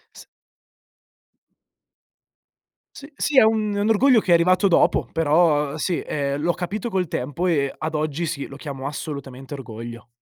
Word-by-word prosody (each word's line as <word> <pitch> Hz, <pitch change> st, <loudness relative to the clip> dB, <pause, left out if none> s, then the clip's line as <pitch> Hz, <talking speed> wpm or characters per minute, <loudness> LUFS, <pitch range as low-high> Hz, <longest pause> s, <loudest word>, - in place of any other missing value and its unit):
S -, -, -13 dB, 2.7 s
S 280 Hz, -, -10 dB
sì, 290 Hz, -2 st, -1 dB
è -, -, +10 dB
un 220 Hz, -1 st, +1 dB
è 200 Hz, -, -2 dB
un 205 Hz, -, +1 dB
orgoglio 235 Hz, +3 st, +5 dB
che 185 Hz, -, -1 dB
è -, -, +8 dB
arrivato 185 Hz, +4 st, +4 dB
dopo, 180 Hz, -, +3 dB
però 150 Hz, -2 st, +2 dB
sì, 175 Hz, +2 st, -1 dB
ehm, 140 Hz, -1 st, -2 dB
l'ho 170 Hz, +3 st, +2 dB
capito 205 Hz, +7 st, -4 dB
col 185 Hz, -4 st, -1 dB
tempo 145 Hz, +7 st, -3 dB
e 140 Hz, -6 st, +1 dB
ad 155 Hz, 0 st, -4 dB
oggi 155 Hz, +2 st, -1 dB
sì, 145 Hz, -4 st, -4 dB
lo 135 Hz, -, -11 dB
chiamo 140 Hz, -3 st, -7 dB
assolutamente 140 Hz, -2 st, -6 dB
orgoglio. 115 Hz, -2 st, -8 dB
155 Hz, 160 wpm, -22 LUFS, 140-185 Hz, 2.7 s, è